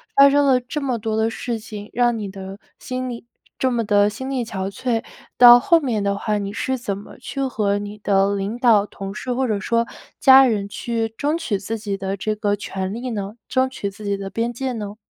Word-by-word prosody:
发 275 0 +8
生 285 +1 +3
了 260 -2 +4
这 255 +5 -4
么 255 -3 -1
多 220 0 -2
的 220 0 +2
事 230 0 -4
情， 210 -1 -9
让 240 -1 +2
你 205 -2 -4
的 190 0 -8 0.2
心 255 0 -4
力 235 -1 -7 0.3
这 260 - +2
么 235 -1 0
地 205 -1 +3
心 260 +5 -6
力 260 -3 -1
憔 195 -3 -4
悴， 230 +1 -1 0.3
到 245 0 +10
后 335 +7 +4
面 235 -6 -1
的 200 0 0
话， 210 0 -1
你 200 0 -4
是 260 +4 -1
怎 205 -5 -3
么 200 - -12
去 275 - -4
和 210 -6 0
你 205 +1 -7
的 200 -1 +2
领 200 +4 -3
导、 230 -5 +4
同 195 -1 -7
事 250 +4 -4
或 260 +2 0
者 215 -3 0
说 230 +4 +1 0.3
家 265 0 +8
人， 205 -5 0
去 225 +1 -3
争 300 +3 0
取 215 -11 -1
自 220 +4 -4
己 205 -2 -4
的 195 0 -3
这 215 +2 -2
个 205 -1 0
权 190 -1 -4
利 245 +3 -4
呢？ 205 -3 -4 0.2
争 260 -1 +2
取 205 -6 -4
自 205 +1 -11
己 200 - 0
的 195 0 -6
边 230 +5 -2
界 260 +2 -3
呢？ 210 -4 -5
220 Hz, 245 characters per minute, -21 LUFS, 200-245 Hz, 0.3 s, 到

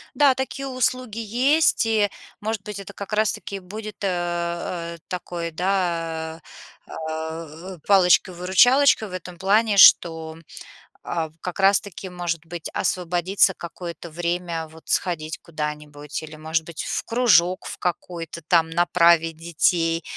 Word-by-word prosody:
Да, 280 -3 +5
такие 275 +1 -4
услуги 255 -3 -1
есть, 250 +6 +3
и 215 -2 +2 0.3
может 215 -1 -3
быть 210 -1 -6
это, 200 0 -9
как 200 +1 -7
раз 215 0 +2
таки, 200 - -6
будет, 210 +3 -8
э, 175 -2 -2
такой, 175 -2 -5
да, 165 -3 -2 0.5
а, - - -11
а, 160 +2 -6
а, - - -19
палочкой-выручалочкой 195 +6 +4
в - - -11
этом 180 -1 -7
плане, 205 +3 +2
что, 160 -4 +6 0.7
а, 160 -2 -2
как 180 +3 -5
раз 195 +1 +5
таки, 195 -1 -9
может 175 -2 -4
быть, 170 -1 -6
освободится 180 +2 +1
какое-то 170 0 -8
время 170 0 -3
вот 160 +1 -17
сходить 160 -4 -1
куда-нибудь, 150 -2 -6
или, 155 - -10
может 160 +1 -2
быть, 165 -1 -6
в - - -3
кружок 205 -6 +3
в - - -6
какой-то 170 -2 -4
там 165 +1 +2
направить 170 -1 +3
детей, 165 0 +1
175 Hz, 135 wpm, -23 LUFS, 165-200 Hz, 0.7 s, что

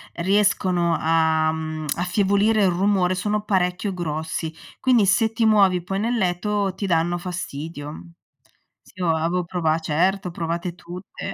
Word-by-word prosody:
riescono 185 -2 +2
a, 160 -1 +2
mhmm, 155 0 -4
affievolire 200 +4 +2
il 190 - +4
rumore 185 0 +1
sono 210 +3 -1
parecchio 190 0 0
grossi, 160 -1 -4 0.3
quindi 245 -5 +3
se 220 +3 +3
ti 225 0 0
muovi 195 -4 +4
poi 195 +3 -3
nel 235 +3 0
letto 195 +1 0
ti 200 - -4
danno 175 -1 +1
fastidio. 160 -4 -6 0.8
Sì - - -22
io 175 - 0
avevo 170 +3 -1
prova 165 -3 0
certo, 180 +4 0
provate 170 +1 -3
tutte. 180 +2 -8
180 Hz, 140 wpm, -23 LUFS, 165-200 Hz, 0.8 s, il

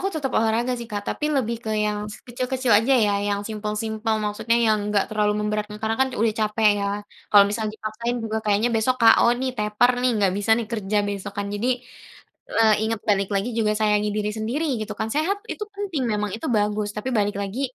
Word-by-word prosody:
Aku 390 - 0
tetap 305 -8 -3
olahraga 225 +3 +1
sih, 235 - -7
Kak. 205 -2 -4
Tapi 300 +7 -2
lebih 235 -3 0
ke - - -4
yang 210 0 -1 0.2
kecil-kecil 255 +1 -1
aja 225 +6 +5
ya, 210 -4 +3
yang 200 0 0
simpel-simpel, 220 +1 -2
maksudnya 210 +3 0
yang 215 -3 +2
nggak 210 0 0
terlalu 210 -1 +1
memberatkan. 210 0 -2
Karena 220 0 0
kan 265 - +4
udah 225 0 +2
capek 215 0 +3
ya, 200 0 -1 0.4
kalau 205 -1 +7
misal 215 +1 -2
dipaksain 220 +3 -4
juga 220 0 -2
kayaknya 210 +3 +2
besok 230 +3 +1
K.O 225 +1 +7
nih, 260 +1 -2
tepar 210 +3 +3
nih, 250 0 +3
nggak 200 -3 +2
bisa 205 +2 -2
nih 235 - -1
kerja 210 -2 0
besok, 205 0 -4
kan. 200 0 -2
Jadi, 215 +5 0 0.8
eee, 220 -1 +4
inget 225 -1 -2
balik 200 -2 +2
lagi 200 +5 0
juga 215 -2 +2
sayangi 210 -1 +1
diri 210 0 -1
sendiri, 225 +9 -2 0.2
gitu 215 0 -5
kan. 220 +1 -3
Sehat 320 - 0
itu 425 - -4
penting 390 -8 -3
memang, 210 -2 -1
itu 225 - -6
bagus, 210 -1 0
tapi 210 +5 -3
balik 205 -4 +1
lagi, 200 +6 -4
215 Hz, 205 wpm, -23 LUFS, 210-235 Hz, 0.8 s, kalau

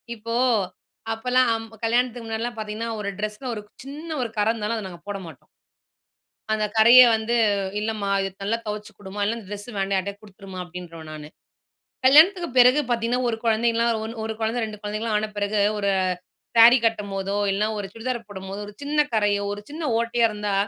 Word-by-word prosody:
இப்போ 230 +1 -5 0.8
அப்பல்லாம் 230 -1 +1 0.2
கல்யாணத்துக்கு 240 0 0
முன்னாடில்லாம் 225 +1 -3
பார்த்தீங்கன்னா, 220 +2 -4
ஒரு 200 -1 -3
ட்ரெஸ்ல 215 +5 -4
ஒரு 210 - -5
க் - - -48
சின்ன 295 +4 -8
ஒரு 230 - -4
கற 205 - +2
இருந்தாலும் 225 0 -2
அத 205 -3 -5
நாங்க 175 -2 -12
போட 200 -1 -3
மாட்டோம். 155 -1 -14 1.0
அந்த 215 -1 +1
கறைய 235 +3 +9
வந்து, 220 +2 -1 0.4
"இல்லம்மா. 215 -2 -2
இது 195 - -2
நல்லா 225 +3 0
தொவச்சு 210 0 -5
குடும்மா, 200 0 -8
இல்ல 230 +3 -1
அந்த 215 - -11
ட்ரெஸ்ஸு 205 +3 -7
வேண்டாம். 195 0 0
யார்ட்டயாவது 200 +2 -4
குடுத்துருமா." 195 -2 -11
அப்படீன்றுவேன் 170 -2 -9
நானு. 150 -1 -8 0.8
கல்யாணத்துக்கு 335 +7 +6
பிறகு 250 +4 +7
பார்த்தீங்கன்னா, 235 +1 0
ஒரு 230 - -1
குழந்தைன்லாம் 230 0 +2
ஒன் 225 +1 -6
1 220 - -3
குழந்தை 225 +2 0
2 215 -1 -7
குழந்தைங்கல்லாம் 215 +1 -2
ஆன 215 - -2
பிறகு, 205 +1 0 0.2
ஒரு 200 -1 +1 0.7
சேரி 235 +3 +9
கட்டும்போதோ, 200 -3 -1 0.2
இல்லன்னா 210 +2 0
ஒரு 205 - -4
சுடிதார் 235 0 -4
போடும்போதோ 195 0 -7
ஒரு 205 - -10
சின்ன 295 +1 +1
கறையோ, 205 -2 +2
ஒரு 205 - -6
சின்ன 315 +3 -6 0.2
ஓட்டையோ 235 0 +1
இருந்தா, 210 -1 -2
220 Hz, 170 wpm, -24 LUFS, 205-235 Hz, 1.0 s, கறைய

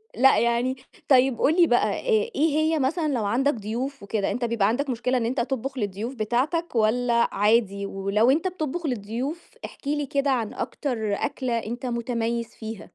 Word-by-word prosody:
لأ، 265 +3 +5
يعني 235 +2 +1 0.3
طيب 260 -2 +4
قُل 325 +5 +3
لي 335 - +6
بقى 245 - +3
آآ، 465 -1 +1
إيه 310 +3 +3
هي 315 0 +2
مثلًا 310 +4 0
لو 225 -4 -1
عندك 265 +7 +2
ضيوف 235 +4 -4
وكده، 200 0 -1
أنت 245 0 -1
بيبقى 225 -4 +1
عندك 270 +5 0
مشكلة 250 +1 0
إن 230 - 0
أنت 255 +3 -1
تطبخ 265 +1 -3
للضيوف 210 +4 -3
بتاعتك 255 +9 -1
والَّا 235 +2 +2
عادي؟ 205 -2 +2
ولو 200 +5 +2
أنت 330 +6 +1
بتطبخ 340 -1 -3
للضيوف 250 - -4
احكِ 280 - -11
لي 295 0 0
كده 275 +1 0
عن 230 -5 -1
أكتر 220 -7 -3
أكلة 255 0 -1
أنت 235 +3 -5
مُتميّز 235 -1 -2
فيها؟ 220 -2 -7
245 Hz, 175 wpm, -25 LUFS, 225-280 Hz, 0.3 s, لي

